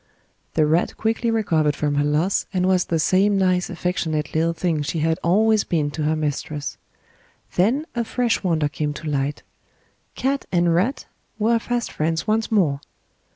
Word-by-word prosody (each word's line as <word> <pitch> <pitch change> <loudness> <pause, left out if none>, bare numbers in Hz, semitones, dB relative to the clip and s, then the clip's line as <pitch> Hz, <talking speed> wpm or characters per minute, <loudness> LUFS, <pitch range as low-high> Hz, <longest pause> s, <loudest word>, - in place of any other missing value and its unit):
The 155 - +4
rat 160 +3 +1
quickly 225 +1 0
recovered 165 -10 +1
from 145 -1 -1
her 145 0 +2
loss 150 +6 +1
and 185 -2 0
was 185 -1 +2
the 165 - 0
same 190 +5 +3
nice 185 -1 +1
affectionate 165 -5 -2
little 165 +1 +2
thing 165 -2 -1
she 145 +3 -3
had 160 +1 +1
always 215 +5 +3
been 150 -4 -1
to 155 - -5
her 155 +1 +2
mistress; 150 -1 -3 0.8
then 240 - +2
a 235 - -1
fresh 240 0 0
wonder 160 -5 +1
came 150 0 -3
to 160 - -7
light 145 0 -2 0.7
cat 275 +2 -1
and 175 -1 +3
rat 205 +12 0 0.3
were 230 +2 +2
fast 240 0 -2
friends 160 +1 -1
once 220 +1 0
more! 155 -10 +2
170 Hz, 165 wpm, -22 LUFS, 155-215 Hz, 0.8 s, The